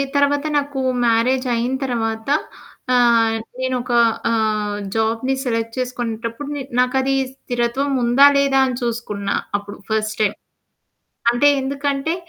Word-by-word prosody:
తర్వాత 285 +1 +2
నాకు 285 -1 -2 0.3
మ్యారేజ్ 255 +3 +2
అయిన 240 +3 -1
తర్వాత 225 -1 -2 0.6
ఆహ్, 235 -2 +4 0.2
నేనొక 255 -1 -2 0.4
ఆహ్, 215 -2 0 0.2
జాబ్‌ని 225 +4 0
సెలెక్ట్ 230 -2 -2
చేసుకునేటప్పుడు 240 +1 -4
న 285 - -4 0.2
నాకు 250 +1 +2
అది 270 +1 0 0.2
స్థిరత్వం 250 +1 -2
ఉందా 245 +4 +6
లేదా 275 -1 +3
అని 255 - -2
చూసుకున్నా 210 -4 -2 0.2
అప్పుడు 205 0 -10
ఫస్ట్ 215 0 -1
టైమ్. 210 -1 +1 0.9
అంటే 240 +4 +3
ఎందుకంటే 275 +3 -1
240 Hz, 115 wpm, -20 LUFS, 225-270 Hz, 0.9 s, ఉందా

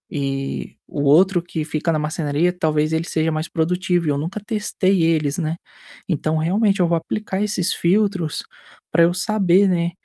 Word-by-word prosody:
e 135 -1 -3
o 145 - -4
outro 175 +5 +5
que 165 -2 -4
fica 155 +1 -1
na 160 - +1
marcenaria 150 +2 0
talvez 155 -3 0
ele 160 +1 0
seja 160 -1 0
mais 155 +1 -3
produtivo 175 +1 0
e - - +2
eu 145 - +1
nunca 170 +8 -4
testei 205 -4 0
eles, 155 -3 +1
né, 160 0 -1 0.5
então 160 -2 -1
realmente 195 +5 +1
eu 175 - +3
vou 170 0 +2
aplicar 195 +3 -3
esses 195 -4 0
filtros 185 -3 0 0.5
para 170 +1 +4
eu 170 +1 +3
saber, 195 0 +3
né, 170 -1 0
170 Hz, 175 wpm, -21 LUFS, 155-185 Hz, 0.5 s, outro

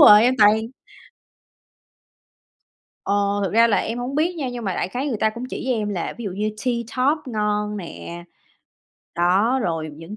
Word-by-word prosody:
rồi, 210 +1 +9
em 250 +2 +4
toàn 210 0 +7 2.5
Ờ, 200 - 0 0.3
thực 190 - -2
ra 230 +2 +6
là 225 - +2
em 230 +2 -2
hổng 250 +3 -4
biết 330 +4 +1
nha 275 -5 -2
nhưng 240 -2 -6
mà 190 -3 -1
đại - - -2
khái 250 +8 -3
người 240 - -1
ta 220 - +3
cũng 235 +3 -7
chỉ - - -5
cho 260 - +2
em 215 -2 -2
là 190 -5 -3
ví 235 - -6
dụ 200 - -3
như 210 +4 -2
Tea 250 -2 +1 0.2
Top 280 +5 +2
ngon 210 -1 -1
nè. 170 -2 -8 0.9
Đó, 195 +9 +3
rồi 165 -3 -2
những 165 +6 -9
215 Hz, 190 wpm, -22 LUFS, 195-245 Hz, 2.5 s, rồi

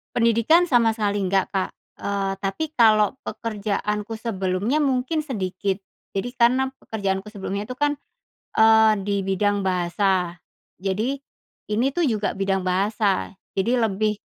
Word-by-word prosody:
Pendidikan 235 +9 +4
sama 240 -8 +4
sekali 205 -2 0
nggak, 195 0 +2
Kak, 190 -1 0 0.3
eee, 200 -1 -1
tapi 250 +11 -3
kalau 215 -5 +5
pekerjaanku 210 0 -3
sebelumnya 210 +4 -1
mungkin 275 +3 +1
sedikit. 195 -8 -2 0.4
Jadi 245 +5 -3
karena 250 +2 +3 0.2
pekerjaanku 195 -1 -3
sebelumnya 200 0 -5
itu 255 - -6
kan, 290 +1 +2 0.7
eee, 220 0 +7
dibidang 200 0 0
bahasa, 180 -1 +1 0.5
jadi 225 +9 -1 0.5
ini 225 +5 +2
tuh 350 - +1
juga 215 -9 0
bidang 195 0 0
bahasa, 195 +1 +1 0.2
jadi 235 +6 +1
lebih 210 +1 -1
210 Hz, 120 wpm, -23 LUFS, 195-235 Hz, 0.7 s, eee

